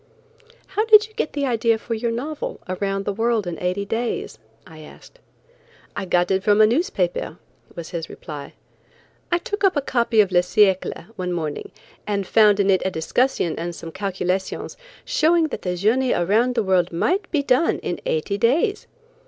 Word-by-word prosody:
"How 395 +3 -1
did 430 -1 +7
you 435 - -24
get 310 - -3
the 285 -1 -1
idea 230 -2 +1
for 230 +1 -5
your 230 +1 -1
novel, 280 +7 -4
'Around 195 +1 -2
the 205 - -1
World 225 0 0
in 175 -2 -5
Eighty 180 +3 -2
Days?'" 225 - -3 0.3
I 160 -1 -13
asked. 155 - -15 0.8
"I 200 - -3
got 175 0 +1
it 190 0 +1
from 205 0 +3
a 215 - +8
newspaper," 380 - -1 0.4
was 170 -1 -7
his 170 -2 -5
reply. 145 -4 -9 0.8
"I 345 - +4
took 410 +4 -5
up 385 -3 +4
a - - +2
copy 235 -4 +1
of 200 -3 +4
Le 175 - +5
Siécle 190 +1 +1
one 180 -1 -3
morning, 160 -4 -4 0.4
and 200 -2 -1
found 210 0 +4
in 200 0 +3
it 190 - +3
a 190 - 0
discussion 180 +2 0
and 170 +1 -4
some 165 - -8
calculations 190 0 -3 0.3
showing 340 -9 +2
that - - -5
the 180 -1 -2
journey 230 +8 +2
around 220 +8 +1
the 230 - +1
world 185 -2 +2
might 365 - 0
be 295 -4 0
done 265 +4 +2
in - - -3
eighty 460 - -1
days. 320 - +1
210 Hz, 180 wpm, -22 LUFS, 180-270 Hz, 0.8 s, a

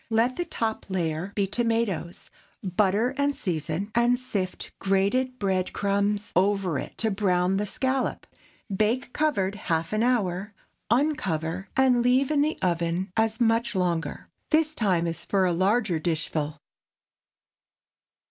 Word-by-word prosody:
Let 230 +3 +2
the 350 - -2
top 225 -8 -3
layer 175 0 -2
be 200 - +2
tomatoes, 225 -5 -1 0.3
butter 205 +6 +1
and 285 0 +1
season, 165 0 -2
and 240 +1 +3
sift 200 -7 -4
grated 200 +7 +1
bread 190 -4 0
crumbs 200 +1 0
over 190 -4 +2
it - - -8
to 220 -1 0
brown 190 -2 +1
the 205 +1 -1
scallop. 260 +4 -1 0.5
Bake 230 +5 0
covered 240 -11 +1
half 165 -3 -2
an 215 - +1
hour; 205 -5 0 0.3
uncover 195 - 0
and 255 -2 +4
leave 255 +3 +3
in 290 -2 +3
the 305 +2 +1
oven 175 +1 0
as 225 0 +1
much 230 -1 +2
longer. 175 -3 -1 0.2
This 310 0 +3
time 185 - +1
is 165 -1 -3
for 195 -2 +1
a 180 - +2
large 205 +6 +2
dishful. 155 -2 -2
200 Hz, 135 wpm, -26 LUFS, 180-240 Hz, 0.5 s, and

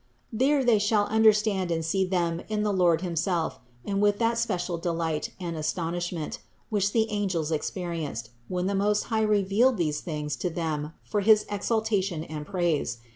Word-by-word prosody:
There 270 +4 +3
they 230 -3 +5
shall 205 0 +2
understand 210 -4 +4
and 165 -1 -1
see 190 +4 +1
them 170 -2 0
in 210 -1 0
the 210 -1 +1
Lord 175 -3 +3
Himself 170 -1 -1 0.3
and 200 0 -1
with 205 0 +3
that 230 +1 +1
special 180 -6 -1
delight 165 -2 -1
and 170 -2 -4
astonishment, 170 +1 -3 0.3
which 200 -1 +1
the 220 0 +2
angels 185 -7 -1
experienced, 155 - -3 0.2
when 180 0 -2
the 200 - 0
Most 205 +1 +2
High 220 - +2
revealed 215 +4 +3
these 150 -4 -1
things 150 -3 -3
to 180 - -1
them 160 -2 -3
for 210 - -1
his 215 +1 +5
exal 220 +2 0
tation 190 -7 -1
and 150 -1 -6
praise. 170 - 0
185 Hz, 170 wpm, -27 LUFS, 165-210 Hz, 0.3 s, they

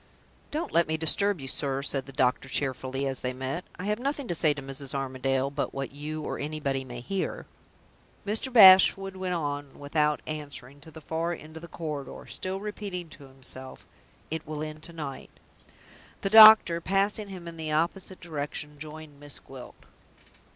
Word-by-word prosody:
"Don't 310 +3 -3
let 170 0 +3
me 160 0 -1
disturb 190 +4 +3
you, 135 - -7
sir," 135 0 -2
said 135 -2 -2
the - - -9
doctor, 130 +1 +1
cheerfully, 135 0 -2
as 135 -2 -2
they 125 0 -3
met. 130 +7 -4
"I 180 - -6
have 210 +2 0
nothing 280 +1 -2
to - - +1
say 160 -2 +3
to 145 0 -4
Mrs. 135 0 -3
Armadale 135 0 -1
but 140 - -3
what 135 -1 -4
you 150 +2 -6
or - - -4
anybody 145 -3 -2
may 120 -2 -8
hear." 195 +9 -3 0.8
Mr. 220 +6 0
Bashwood 195 -3 +8
went 185 -1 -2
on, 145 -3 -4
without 150 +1 0
answering, 145 -3 -5
to 160 - -13
the 160 0 -12
far 165 +3 -2
end 155 -1 -10
of 160 - -8
the 170 - -9
corridor, 150 -4 -6
still 190 +1 -3
repeating 200 -4 -5
to 140 -2 -13
himself: 130 0 -10 0.5
"It 160 0 -3
will 155 0 -4
end 155 0 -7
to 170 +2 -8
night!" 145 -5 -7 0.9
The 195 - -1
doctor, 215 -6 +9
passing 200 +3 0
him 180 -3 -8
in 170 - -7
the 155 -1 -3
opposite 175 +4 -1
direction, 150 -2 -5
joined 155 -1 -9
Miss 145 -1 -4
Gwilt. 130 -2 -12
155 Hz, 180 wpm, -28 LUFS, 135-180 Hz, 0.9 s, doctor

